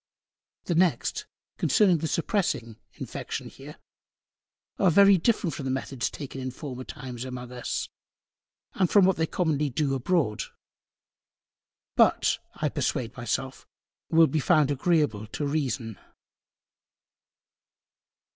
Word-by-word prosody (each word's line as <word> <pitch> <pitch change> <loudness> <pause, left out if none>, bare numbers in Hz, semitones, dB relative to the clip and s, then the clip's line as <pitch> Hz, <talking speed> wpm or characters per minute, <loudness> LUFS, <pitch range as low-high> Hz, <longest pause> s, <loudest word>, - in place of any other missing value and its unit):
The 175 - -1
next, 170 0 +1 0.3
concerning 190 -7 +4
the 160 - -2
suppressing 155 - -1 0.2
Infection - - -6
here, - - -12 1.0
are 190 - +5
very 200 +3 +7
different 195 -4 +1
from 140 - -6
the - - -1
Methods 130 -1 -2
taken 135 -2 -7
in 130 - -3
former 130 -1 -7
Times 125 -2 -7
among 125 -1 -7
Us, 125 -1 -3 0.9
and 185 -3 +1
from 200 -3 +6
what 190 -1 +3
they 160 0 +1
commonly 150 -5 0
Do 140 +2 0
Abroad: 135 -5 0 1.5
But, - - +3 0.2
I - - -1
persuade 120 -3 -2
my 120 - -7
self, 130 +4 -3 0.4
will 165 0 +6
be 155 0 0
found 150 -1 +3
agreable 145 - +1
to 145 +7 -4
Reason. 130 - -2
145 Hz, 120 wpm, -27 LUFS, 125-170 Hz, 1.5 s, very